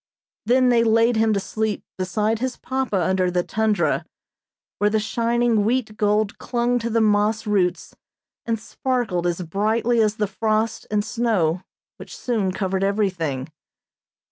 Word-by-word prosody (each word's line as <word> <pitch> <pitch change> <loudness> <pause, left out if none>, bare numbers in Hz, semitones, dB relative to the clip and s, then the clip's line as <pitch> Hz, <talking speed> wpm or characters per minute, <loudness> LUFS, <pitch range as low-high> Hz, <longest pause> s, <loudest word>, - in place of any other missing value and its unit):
Then 255 +1 +4
they 235 -1 +4
laid 230 +1 +3
him 220 0 +3
to 200 - +1
sleep 215 +1 -2
beside 210 +4 -1
his 255 0 -3
papa 260 -6 -2
under 185 +1 +1
the 180 0 0
tundra, 220 +1 0 0.8
where 205 - +3
the 220 +1 +1
shining 235 0 +1
wheat 225 -1 0
gold 210 0 0
clung 245 0 0
to 235 0 -3
the 230 0 +1
moss 210 +1 +2
roots 195 -4 0 0.5
and 230 -1 -1
sparkled 220 -7 -2
as 175 +1 -2
brightly 220 +7 +1
as 215 -1 +2
the 215 - 0
frost 215 +2 -1
and 210 0 0
snow 215 -8 0 0.4
which - - -10
soon 215 -7 -1
covered 190 0 -1
everything. 180 -10 -1
215 Hz, 145 wpm, -22 LUFS, 195-230 Hz, 0.8 s, Then